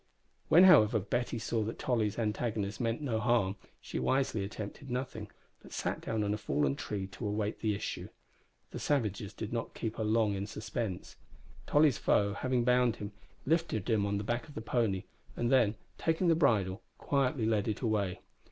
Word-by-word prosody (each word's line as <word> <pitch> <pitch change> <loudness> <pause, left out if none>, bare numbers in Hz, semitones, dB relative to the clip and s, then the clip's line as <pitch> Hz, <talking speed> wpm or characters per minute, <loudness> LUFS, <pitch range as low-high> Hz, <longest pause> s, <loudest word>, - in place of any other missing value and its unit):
When, 175 - +8
however, 115 - +7
Betty 120 +5 -2
saw 115 0 -1
that 110 +2 -3
Tolly's 110 -5 0
antagonist 105 -2 -1
meant 115 +3 -1
no 115 -6 0
harm, 115 -5 +2 0.2
she - - -5
wisely 130 -6 +1
attempted 105 +6 -7
nothing, 125 -4 -4 0.3
but - - -13
sat - - -2
down 110 -2 -1
on 105 0 0
a 105 - -3
fallen 70 -8 0
tree 100 +4 -4
to 100 +3 -6
await 105 +1 -2
the 110 -2 0
issue. - - -5 0.6
The - - -5
savages 105 -8 -1
did 110 +1 -6
not 115 -1 -3
keep 110 -2 -4
her 110 - -1
long 110 -1 +2
in 100 0 -3
suspense. 105 -3 -5 0.5
Tolly's 145 -4 +4
foe, 100 0 +2
having 125 +3 0
bound 125 -1 +3
him, 105 0 -6 0.3
lifted 160 - 0
him 105 -2 +2
on 100 0 0
the 100 - -3
back 120 +7 -2
of 150 - -13
the - - -4
pony, 110 -5 0 0.3
and 120 0 0
then, 120 -5 +4 0.2
taking 165 +2 +1
the - - +6
bridle, 110 - +2 0.2
quietly 130 -4 0
led 110 -2 +1
it 110 - -2
away. 100 -6 0
110 Hz, 180 wpm, -32 LUFS, 105-125 Hz, 0.6 s, When